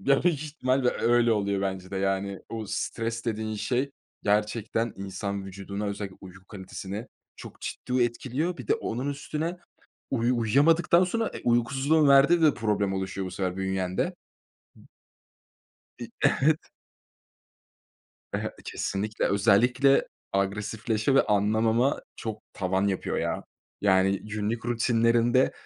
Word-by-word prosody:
Ya 140 0 +3
büyük 165 -4 +2
ihtimalle 130 -4 0
öyle 120 0 +3
oluyor 100 -2 0
bence 95 -1 -3
de 100 - -4
yani 95 0 -1
o 110 -2 -5
stres 115 +2 -3
dediğin 110 -1 -2
şey 130 +5 -1 0.3
gerçekten 105 +2 0
insan 100 +1 -4
vücuduna 100 +2 -5
özellikle 100 -1 -5
uyku 95 0 -13
kalitesine 100 +3 -7 0.3
çok - - -11
ciddi 125 0 -1
etkiliyor. 130 +8 -1
Bir 125 -6 -9
de - - +4
onun 125 +5 -3
üstüne 155 +4 -3 0.5
uyu 120 -1 +1
uyuyamadıktan 160 - +4
sonra 225 +5 0
e, - - -7
uykusuzluğun 135 +6 +3
verdiği 140 +5 +6
de 155 -2 +5
problem 105 -3 0
oluşuyor 95 0 -3
bu - - -8
sefer 90 0 -2
bünyende. 95 -1 -1 0.6
B - - -18 1.2
İii. - - -7
Evet. 155 +3 +3 1.7
E, - - +1
he - - -3
Kesinlikle. 105 +2 -2
Özellikle 120 +7 +4 0.3
agresifleşme 105 +4 0
ve 135 - +6
anlamama 110 +5 +2 0.2
çok 110 -1 -5
tavan 95 +1 0
yapıyor 95 -2 -1
ya. - - -2 0.4
Yani 95 -1 +3
günlük 110 +2 -3
rutinlerinde 120 +1 +3
110 Hz, 125 wpm, -27 LUFS, 100-130 Hz, 1.7 s, verdiği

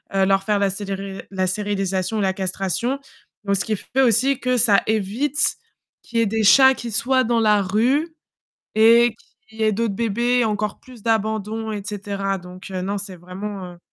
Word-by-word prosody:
heu, 195 0 +3
leur 195 0 +2
faire 210 +1 +1
la 200 -1 +2
sérili 195 0 -5
la 190 -1 -1
stérilisation, 195 +1 -1
la 190 -1 +2
castration. 195 - -2 0.5
Donc 200 -1 +1
ce - - -2
qui 220 - -1
f - - -13
fait 265 - +3
aussi 255 +2 +3
que 255 -1 0
ça 215 -4 +5
évite 220 +8 0 0.4
qu'il 235 -2 -3
y - - +4
ait - - +3
des 220 +1 -1
chats 265 +5 +7
qui 235 -2 -6
soient 255 +4 +2
dans 230 0 +1
la 210 -2 +4
rue 255 - 0 0.6
et 230 +1 +5 0.3
qu'il 220 -1 -17
y - - +1
ait 215 - +4
d'autres 220 0 -1
bébés, 235 +3 +1
encore 210 -1 -2
plus 250 -4 -15
d'abandons, 220 0 -1
et 210 -2 -4
cetera 200 -1 -3
donc 180 +1 -11
heu, 185 -1 -3
non, 200 +2 -2
c'est 195 -1 -6
vraiment, 185 +1 -7
heu - - -19
210 Hz, 195 wpm, -21 LUFS, 195-230 Hz, 0.6 s, chats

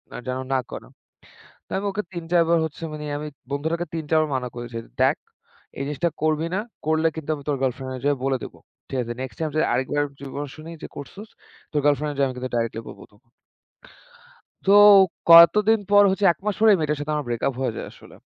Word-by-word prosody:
আর - - -6
যেন 130 0 -2
না 135 - +2
করে।" - - -8 0.8
তো - - -26
আমি 195 - -3
ওকে 210 +2 -3
৩-৪ 170 0 +1
বার 170 0 +4
হচ্ছে 160 +1 -8
মানে, 150 0 -6
আমি 150 +1 -5 0.2
বন্ধুটাকে 160 +4 -2
৩-৪ 160 0 +1
বার 155 - -1
মানা 125 -1 -3
করেছি। 120 -1 -7 0.2
"দেখ, - - +3 0.6
এই - - -2
জিনিসটা 150 +4 -1
করবি 155 +1 +1
না, - - 0 0.3
করলে 160 +1 +2
কিন্তু 160 -2 -7
আমি 145 - -11
তোর 145 - 0
গার্লফ্রেন্ডর 130 0 -3
যেয়ে 145 -1 +2
বলে 135 -1 +1
দিবো। - - -9 0.3
ঠিক 135 - -3
আছে 120 0 -5
নেক্সট 130 -1 -7
টাইম 160 -1 -1
যদি 155 - +2
আরেকবার 130 +4 0 0.2
যদি 140 - -9
কোন 145 +1 -3
শুনি 155 +2 -10
যে - - -5
করছোস, 195 +10 -10 0.4
তোর 150 - 0
গার্লফ্রেন্ডরে 145 0 +1
যায়া 140 - +3
আমি 130 - -7
কিন্তু 130 0 -5
ডাইরেক্টলি 115 -1 -2
বলবো - - -11
তখন।" 120 +3 -28 1.4
তো 195 - +6 0.6
কতদিন 210 +7 +8
পর 205 0 +7
হচ্ছে 195 +1 0
১ - - -33
মাস 210 -2 0
পরেই 220 0 +6
ওই - - -4
মেয়েটার 150 -1 -1
সাথে 150 +1 -3
আমার 150 -2 -3
ব্রেক 120 -1 -3
আপ 135 - -1
হয়ে 125 -4 -1
যায় - - -5
আসলে, - - -16
150 Hz, 215 wpm, -23 LUFS, 130-165 Hz, 1.4 s, কতদিন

